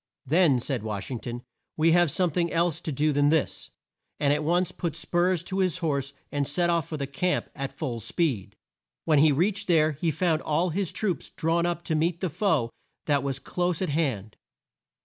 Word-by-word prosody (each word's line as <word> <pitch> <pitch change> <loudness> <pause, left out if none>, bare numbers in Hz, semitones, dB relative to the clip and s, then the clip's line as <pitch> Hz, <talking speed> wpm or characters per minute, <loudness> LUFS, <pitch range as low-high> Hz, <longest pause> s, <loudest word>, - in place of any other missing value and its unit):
"Then," 155 -2 +4
said 125 -1 -2
Wash 105 0 -5
ing 125 - -3
ton, 120 +1 -6 0.3
"we 160 +1 +4
have 175 -1 +4
some 180 +3 +1
thing 170 +1 0
else 170 -1 +1
to 155 - -3
do 150 +2 +1
than 145 +1 +3
this," 160 -1 0 0.5
and 145 -1 +3
at 150 +1 -1
once 175 +3 +1
put 170 -3 -4
spurs 175 +1 0
to 190 +2 -3
his 185 -2 +1
horse 140 -5 -1 0.2
and 145 -1 -1
set 175 +4 +2
off 165 -2 0
for 155 - -4
the 140 - -2
camp 160 +7 -1
at 135 -1 -4
full 125 -7 -4
speed. 125 - -1 0.5
When 155 -3 +4
he 155 +1 +6
reached 185 +8 +1
there 160 -3 +4
he 155 +3 -1
found 160 0 +1
all 165 +4 0
his 190 +1 -1
troops 200 -5 -2
drawn 170 +2 0
up 175 -1 -2
to 165 - -2
meet 165 +2 +1
the 185 -4 -2
foe 160 - +1 0.3
that 145 -2 +2
was 135 -1 -2
close 175 +3 -2
at 185 - -1
hand. 130 -10 -1
160 Hz, 205 wpm, -26 LUFS, 140-175 Hz, 0.5 s, he